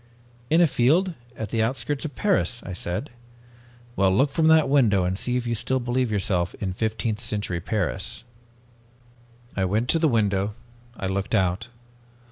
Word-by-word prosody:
"'In 165 +2 +4
a - - +7
field 165 +7 +2 0.2
at 110 -2 -4
the 115 0 0
outskirts 135 +5 -1
of 145 -4 -6
Paris,' 115 0 +1
I 95 - -6
said. 90 +10 -3 0.8
"'Well, 95 -1 +3
look 135 +9 +3
from 160 +2 +2
that 160 -2 +5
window 115 -9 +3
and 90 +1 0
see 125 +5 0
if 125 - -3
you 120 - -1
still 130 +4 0
believe 125 0 0
yourself 95 -4 0
in 100 - -3
your 110 +2 +1
15th 110 -1 -3
century 105 -6 -2
Paris.' 95 +1 -2 1.3
"I 95 - 0
went 110 +6 0
to 165 - +3
the 160 - +3
window. 105 -3 +1 0.4
I - - -4
looked 95 +3 -1
out. 95 +2 0
110 Hz, 170 wpm, -24 LUFS, 95-130 Hz, 1.3 s, a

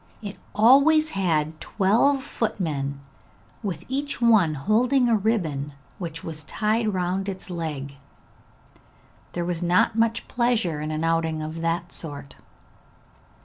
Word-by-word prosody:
It 200 -1 -7 0.2
always 280 +8 +5
had 160 -5 0
twelve 235 +8 +2
footmen, 150 - -2 0.6
with 195 -4 -4
each 280 +3 -3
one 215 -10 +4
holding 240 - +2
a 230 - +4
ribbon 165 -10 -1 0.3
which 165 -3 -6
was 155 -2 -4
tied 215 +4 0
round 185 +1 -1
its 190 -1 -7
leg. 145 -5 -5 1.4
There 175 -1 -2
was 175 -1 -2
not 180 +5 +3
much 230 0 +1
pleasure 230 -11 0
in 155 - -3
an 155 +1 -2
outing 165 -1 0
of 160 +2 -5
that 170 +1 -1
sort. 145 -4 -6
180 Hz, 125 wpm, -24 LUFS, 160-225 Hz, 1.4 s, always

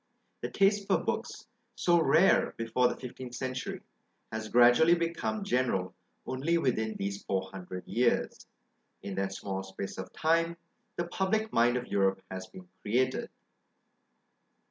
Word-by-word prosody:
The - - -3
taste 200 0 +2
for - - +4
books, - - -3 0.3
so 175 -1 +3
rare 165 +4 +4
before 115 +2 +2
the - - -2
fifteenth 125 -1 -8
century, 130 0 -4 0.5
has 110 0 -4
gradually 120 +8 +6
become 170 +5 -2
general 125 - 0 0.3
only 145 +7 0
within 110 -8 0
these 100 0 -4
four 95 -1 -2
hundred 90 -1 -8
years: 120 0 0 0.6
in 100 - -5
that 95 0 -1
small 95 -1 -4
space 95 0 -7
of - - -6
time 165 +1 +1 0.4
the 175 - -1
public 195 +5 -1
mind 120 +1 +4
of 125 - -4
Europe 95 -2 +1
has 95 0 -6
been 185 -1 -13
created. 130 +4 0
125 Hz, 140 wpm, -30 LUFS, -, 0.6 s, gradually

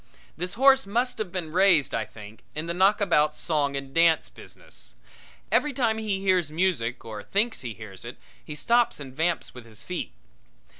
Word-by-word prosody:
This 180 +2 -4
horse 270 -2 +5
must 240 +4 -1
have 205 -5 -3
been 170 -4 -4
raised, 180 -4 +4
I 110 - -1
think, 110 0 -13
in 155 +1 -3
the 170 - -2
knockabout 180 -5 +3
song 145 -4 0
and 135 -1 -6
dance 165 0 +4
business. - - -11 0.6
Every 295 -1 +2
time 230 -4 +1
he 210 -3 -1
hears 185 -5 +2
music 150 -9 -1
or 110 -2 -6
thinks 220 - -1
he 120 -4 -6
hears 105 -4 -10
it 120 +1 -8 0.3
he 150 - -8
stops 235 +5 +2
and 135 -3 -8
vamps 165 +2 -1
with 125 -2 -11
his 110 0 -10
feet. 180 +6 -4
170 Hz, 180 wpm, -26 LUFS, 135-200 Hz, 0.6 s, horse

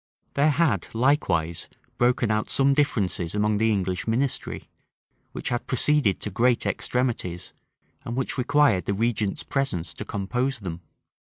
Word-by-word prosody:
There 145 +2 +3
had 140 - +1
likewise 100 - +1 0.3
broken 120 -2 +2
out 110 0 0
some 140 0 +3
differences 100 - 0
among 105 0 +1
the 110 0 +3
English 95 -2 -1
ministry, 125 +4 -1 0.6
which - - -4
had 120 -1 -2
proceeded 135 -5 +2
to 105 - -3
great 120 +5 +2
extremities, 115 -9 -2 0.5
and 115 - -4
which 130 - -2
required 140 -6 +3
the 100 - -1
regent's 110 -2 -1
presence 90 - -2
to - - -6
compose 125 +5 -2
them. 85 -3 -6
115 Hz, 135 wpm, -25 LUFS, 95-135 Hz, 0.6 s, There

